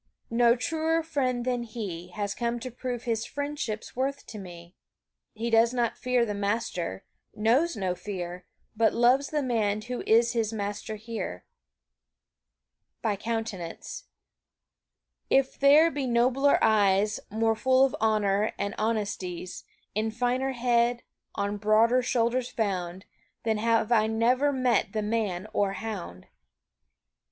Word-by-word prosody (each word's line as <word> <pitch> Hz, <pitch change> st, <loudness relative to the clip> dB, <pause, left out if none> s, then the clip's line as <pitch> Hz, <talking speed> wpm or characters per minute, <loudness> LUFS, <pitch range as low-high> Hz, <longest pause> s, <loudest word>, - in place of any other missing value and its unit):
No 235 Hz, 0 st, +4 dB
truer 325 Hz, +4 st, 0 dB
friend 255 Hz, -6 st, -1 dB
than 250 Hz, -1 st, 0 dB
he 205 Hz, -7 st, -6 dB
Has 200 Hz, +2 st, -3 dB
come 235 Hz, 0 st, -2 dB
to 255 Hz, +1 st, -5 dB
prove 245 Hz, 0 st, -5 dB
his 225 Hz, -2 st, -1 dB
friendship's 285 Hz, -5 st, -4 dB
worth 275 Hz, +2 st, -2 dB
to 215 Hz, -, -8 dB
me. 175 Hz, -2 st, -11 dB, 0.6 s
He 230 Hz, +2 st, -3 dB
does 230 Hz, +2 st, +4 dB
not 240 Hz, -2 st, 0 dB
fear 250 Hz, -1 st, +1 dB
the 210 Hz, -, -3 dB
master 200 Hz, -, -2 dB, 0.3 s
knows 255 Hz, +11 st, +2 dB
no 190 Hz, -3 st, -1 dB
fear 180 Hz, -2 st, -6 dB, 0.3 s
But 225 Hz, 0 st, +2 dB
loves 250 Hz, +4 st, +4 dB
the 300 Hz, -2 st, -1 dB
man 215 Hz, -4 st, 0 dB
who 250 Hz, +1 st, -4 dB
is 235 Hz, +2 st, +4 dB
his 225 Hz, -2 st, 0 dB
master 205 Hz, 0 st, -4 dB
here. 225 Hz, +1 st, -6 dB, 1.6 s
By 215 Hz, -3 st, +1 dB
countenance. 215 Hz, -5 st, -5 dB, 1.2 s
If 270 Hz, 0 st, +2 dB
there 295 Hz, +4 st, +6 dB
be 280 Hz, -3 st, -2 dB
nobler 255 Hz, +4 st, +3 dB
eyes, 205 Hz, -1 st, +3 dB
More 225 Hz, +2 st, +1 dB
full 260 Hz, +3 st, +4 dB
of 270 Hz, -, -2 dB
honor 210 Hz, -1 st, +2 dB
and 200 Hz, 0 st, -2 dB
of -, -, -9 dB
honesties, 200 Hz, -5 st, -3 dB, 0.3 s
In 215 Hz, +2 st, 0 dB
finer 250 Hz, +4 st, 0 dB
head, 240 Hz, -1 st, +1 dB, 0.3 s
on 200 Hz, +1 st, -1 dB
broader 220 Hz, +4 st, +4 dB
shoulders 245 Hz, 0 st, 0 dB
found, 190 Hz, -3 st, -3 dB, 0.4 s
Then 220 Hz, -2 st, 0 dB
have 225 Hz, 0 st, +1 dB
I 220 Hz, -2 st, +4 dB
never 245 Hz, +6 st, +2 dB
met 250 Hz, -7 st, +1 dB
the 215 Hz, -1 st, -1 dB
man 210 Hz, -4 st, -1 dB
or 200 Hz, -1 st, +1 dB
hound. 185 Hz, -, -6 dB
225 Hz, 135 wpm, -27 LUFS, 205-250 Hz, 1.6 s, there